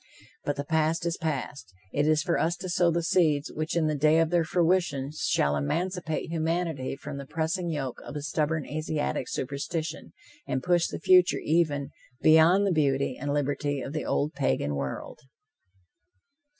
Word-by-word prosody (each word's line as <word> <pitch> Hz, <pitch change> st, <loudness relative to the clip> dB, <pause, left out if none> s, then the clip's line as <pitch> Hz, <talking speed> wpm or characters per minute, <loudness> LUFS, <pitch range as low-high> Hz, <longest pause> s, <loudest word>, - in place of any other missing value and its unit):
But 145 Hz, -, -1 dB
the 140 Hz, -, -3 dB
past 160 Hz, +2 st, +1 dB
is 170 Hz, 0 st, 0 dB
past. 140 Hz, -, -4 dB, 0.2 s
It 145 Hz, +1 st, +1 dB
is 155 Hz, -1 st, +3 dB
for 175 Hz, -2 st, 0 dB
us 170 Hz, +2 st, +1 dB
to 185 Hz, +1 st, -7 dB
sow 175 Hz, 0 st, +3 dB
the 170 Hz, 0 st, 0 dB
seeds 155 Hz, -4 st, +2 dB
which 155 Hz, +2 st, -3 dB
in 165 Hz, -, +2 dB
the 155 Hz, -, +1 dB
day 150 Hz, +2 st, +3 dB
of 165 Hz, 0 st, +2 dB
their 175 Hz, -1 st, +3 dB
fruition 165 Hz, -5 st, +1 dB
shall 70 Hz, -, +1 dB
emancipate 165 Hz, -, -2 dB
humanity 160 Hz, -4 st, -1 dB
from 140 Hz, +1 st, -7 dB
the 140 Hz, -1 st, -7 dB
pressing 165 Hz, +3 st, -2 dB
yoke 135 Hz, -6 st, -4 dB
of 145 Hz, -, -9 dB
a 145 Hz, -, -4 dB
stubborn 155 Hz, 0 st, -1 dB
Asiatic 155 Hz, -3 st, -2 dB
superstition, 155 Hz, +4 st, -4 dB, 0.3 s
and 130 Hz, 0 st, -2 dB
push 175 Hz, -1 st, +2 dB
the -, -, -5 dB
future 180 Hz, -1 st, +5 dB
even 150 Hz, -3 st, +1 dB, 0.3 s
beyond 160 Hz, +5 st, +5 dB
the 195 Hz, -, +2 dB
beauty 140 Hz, -5 st, +1 dB
and 145 Hz, +2 st, -4 dB
liberty 145 Hz, 0 st, -1 dB
of 135 Hz, -, -6 dB
the 155 Hz, -, -2 dB
old 150 Hz, +2 st, 0 dB
Pagan 65 Hz, +2 st, 0 dB
world! 70 Hz, -2 st, -5 dB
155 Hz, 170 wpm, -27 LUFS, 140-170 Hz, 0.3 s, future